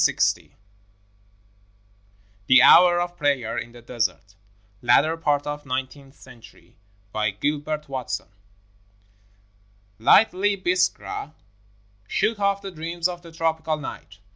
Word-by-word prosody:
I - - 0 2.0
THE 130 -1 +7
HOUR 175 0 +7
OF 175 0 -3
PRAYER 130 -6 0
IN 120 - -8
THE 120 -1 -14
DESERT 115 -5 -3 0.5
[Latter 125 +7 +3
part 145 -3 0
of 145 0 -5
nineteenth 135 +1 -5
century] 125 -3 -17 0.4
BY 105 0 0
GILBERT 150 +6 -3
WATSON 130 -3 -5 1.7
Lightly 200 - +4
Biskra 180 -4 -1 0.7
shook 220 - 0
off 200 0 0
the 195 - -6
dreams 170 +1 -3
of 175 -1 -7
the 170 -1 -13
tropical 160 -1 -1
night. 100 - -9
150 Hz, 110 wpm, -23 LUFS, 130-175 Hz, 2.0 s, THE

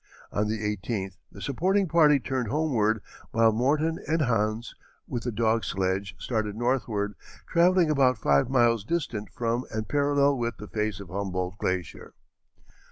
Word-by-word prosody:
On 105 +1 0
the 110 +1 -1
18th 100 -2 -3
the - - -10
supporting 190 +8 +1
party 155 -4 +5
turned 130 -2 -2
homeward, 115 -6 +1 0.3
while 115 0 +4
Morton 150 +8 +1
and 160 +1 +2
Hans, 110 -2 0 0.3
with 120 0 -4
a - - 0
dog 110 0 +1
sledge, 95 +2 -1
started 110 -4 -2
northward, 110 -4 -1 0.3
travelling 175 -1 +4
about 130 -4 +3
five 70 - +2
miles 120 -4 +3
distant 115 -7 -3
from 120 0 -1
and 110 0 -4
parallel 145 -1 +2
with 120 0 -2
the 105 - -9
face 105 -3 -2
of 100 -4 -9
Humboldt 95 0 -3
glacier. 90 -3 -3
115 Hz, 150 wpm, -27 LUFS, 105-140 Hz, 0.3 s, party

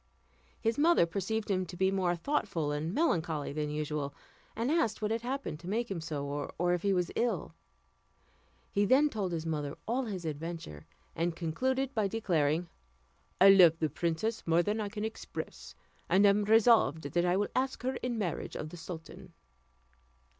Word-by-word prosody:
His 225 +4 0
mother 325 - +5
perceived 205 +5 -2
him 185 -1 +1
to 175 - -9
be 190 +1 +2
more 185 -2 +1
thoughtful 175 - -1
and 150 +3 -2
melancholy 165 - 0
than 150 0 -2
usual; 150 -1 -3 0.4
and 235 +5 0
asked 315 -10 +1
what 215 0 -1
had 225 0 0
happened 255 - -4
to 170 - -11
make 230 +2 -1
him 175 -4 -3
so, 150 -3 -4 0.3
or 175 +1 +2
if 175 - -1
he 200 - +1
was 180 -3 0
ill. 240 0 -1 1.2
He 200 - +2
then 270 +8 +4
told 200 -8 -2
his 165 -1 -3
mother 150 -3 -3
all 250 +3 0
his 190 -6 -5
adventure, 155 - -6 0.3
and 170 0 -1
concluded 260 - -1
by 215 -5 +1
declaring, 175 -6 0 0.7
"I 195 - +8
love 180 -4 +7
the 155 -3 -1
princess 170 +9 -1
more 165 +1 +4
than 210 +3 -1
I 205 - -3
can 210 +1 -4
express, 220 - -7 0.3
and 200 +2 +5
am 200 +1 +4
resolved 220 - +4
that 175 +5 0
I 180 +1 +2
will 205 - 0
ask 260 -1 -1
her 260 +1 0
in 245 -2 -3
marriage 185 -7 -3
of 155 - -5
the 175 - -10
sultan." 160 -1 -9
185 Hz, 175 wpm, -31 LUFS, 160-225 Hz, 1.2 s, I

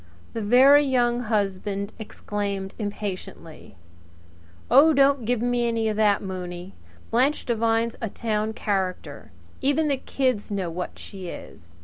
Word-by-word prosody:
The 225 - -3
Very 265 +7 +6
Young 245 -3 +1
Husband 200 -2 -2
exclaimed 200 -2 -4
impatiently: 200 - -6 1.0
"Oh, 310 +3 +7
don't 275 -3 +3
give 240 0 0
me 245 -1 +1
any 225 -1 0
of 215 - -2
that, 210 -2 +3
Mooney! 180 -1 -6 0.4
Blanche 260 +6 +2
Devine's 230 0 0
a 225 - -2
town 215 0 -2
character. 195 -4 -3 0.3
Even 295 +3 +1
the 280 - +1
kids 255 -5 -1
know 195 -4 -2
what 180 +2 -5
she 190 -2 -9
is. 85 - -11
220 Hz, 130 wpm, -24 LUFS, 195-245 Hz, 1.0 s, Oh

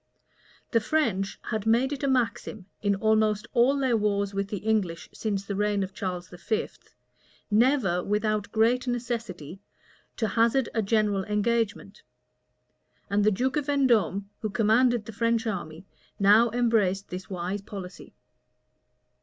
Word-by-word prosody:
The 230 - +4
French 220 -7 0
had 220 -1 -2
made 245 +5 +3
it 280 - -6
a 280 - 0
maxim, 235 -6 -1 0.2
in 200 -1 +1
almost 215 0 +2
all 260 +3 +4
their 260 -3 +1
wars 200 -2 0
with 200 0 -2
the 205 - -4
English 205 -5 -1
since 200 -3 -3
the 200 - -4
reign 205 0 +1
of 190 0 -6
Charles 180 -2 -4
V., 195 +5 -2 0.8
never, 215 -6 +3
without 210 0 -1
great 240 +3 +2
necessity, 225 -9 -4 0.6
to 220 -3 0
hazard 235 +2 +2
a 225 - +1
general 205 -2 +1
engagement; 215 +1 -1 1.1
and 205 0 +2
the 210 - +5
duke 255 +8 0
of 295 -1 -2
Vendôme, 240 -9 +2 0.2
who 215 - -3
commanded 225 +3 +2
the 225 - -7
French 230 +1 0
army, 175 -5 -5 0.3
now 210 +4 +6
embraced 215 -5 +1
this 185 +1 -7
wise 185 +2 -3
policy. 195 -2 -9
215 Hz, 140 wpm, -27 LUFS, 195-235 Hz, 1.1 s, now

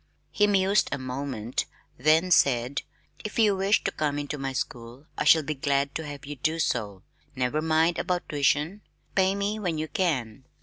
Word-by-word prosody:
He 210 - +3
mused 200 0 +3
a 140 - -1
moment, 130 -3 -4 0.3
then 155 +7 +3
said, 130 -3 +3 0.4
"If 215 - -6
you 215 -3 +4
wish 195 +2 +2
to - - 0
come 145 -2 -1
into 145 0 -4
my 135 0 -2
school 120 +1 -5
I - - -2
shall 160 -1 +6
be 155 +2 -2
glad 140 0 0
to 160 - -4
have 145 -2 -8
you 145 0 -7
do 155 +5 0
so. 105 - -2 0.3
Never 130 +4 0
mind 160 +2 +2
about 180 -1 -2
tuition, 150 +6 +1 0.3
pay 190 0 +2
me 205 +2 -2
when 175 -6 -2
you 155 +1 -2
can." 135 - -2
150 Hz, 180 wpm, -26 LUFS, 135-180 Hz, 0.4 s, shall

